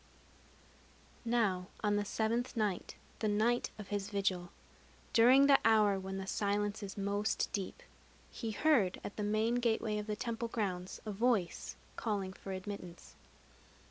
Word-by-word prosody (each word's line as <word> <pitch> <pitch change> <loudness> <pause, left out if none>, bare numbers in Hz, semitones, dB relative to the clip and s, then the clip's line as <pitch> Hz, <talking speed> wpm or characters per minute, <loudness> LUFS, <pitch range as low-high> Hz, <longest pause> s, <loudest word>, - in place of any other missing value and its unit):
Now 210 -6 +1 0.2
on 205 -1 +2
the 205 0 0
seventh 230 +4 -1
night, 210 -5 -1 0.2
the 220 - 0
night 220 +4 +2
of 210 -2 -9
his 205 -1 -2
vigil, 195 -4 0 0.6
during 255 +4 +7
the 280 -1 +7
hour 210 -3 +4
when 190 0 -5
the 195 - -4
silence 205 +1 -1
is 200 -1 -6
most 200 +2 0
deep, 205 - -4 0.5
he 225 - -4
heard 220 -5 +2
at - - -6
the - - -4
main 215 +3 +1
gateway 220 -2 +1
of 210 - -6
the 210 - -1
temple 230 +1 -3
grounds 190 -6 -3
a 215 - -3
voice 210 -4 0 0.2
calling 200 -4 -2
for 195 - -8
admittance. 185 -2 -7
210 Hz, 145 wpm, -34 LUFS, 195-225 Hz, 0.6 s, during